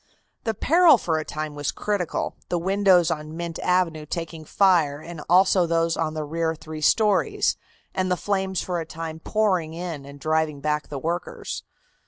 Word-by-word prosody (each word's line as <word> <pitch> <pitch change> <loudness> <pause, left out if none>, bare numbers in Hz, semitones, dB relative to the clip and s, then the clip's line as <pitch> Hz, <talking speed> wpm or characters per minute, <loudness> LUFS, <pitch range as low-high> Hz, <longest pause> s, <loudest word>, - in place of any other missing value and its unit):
The 225 -1 0
peril 330 - +6
for 165 -6 -1
a - - -3
time 155 0 -5
was 145 -1 -2
critical, 200 -5 -2
the 175 - +1
windows 185 -1 +3
on 155 +1 -4
Mint 170 -1 -4
Avenue 170 -4 +1
taking 165 -1 -5
fire 165 -7 +3
and 165 0 -8
also 185 0 +5
those 165 0 +1
on 160 -1 -2
the 155 - -2
rear 160 +2 -1
three 155 0 -8
stories, 200 -1 +3 0.4
and 185 0 0
the 180 - +1
flames 190 -1 -1
for 180 -2 -2
a 165 - -4
time 160 -1 -6
pouring 185 -5 0
in 170 -4 -5
and 140 +1 -11
driving 155 -1 0
back 150 +1 -1
the 145 - -5
workers. 170 +5 -4
165 Hz, 175 wpm, -24 LUFS, 155-185 Hz, 0.4 s, peril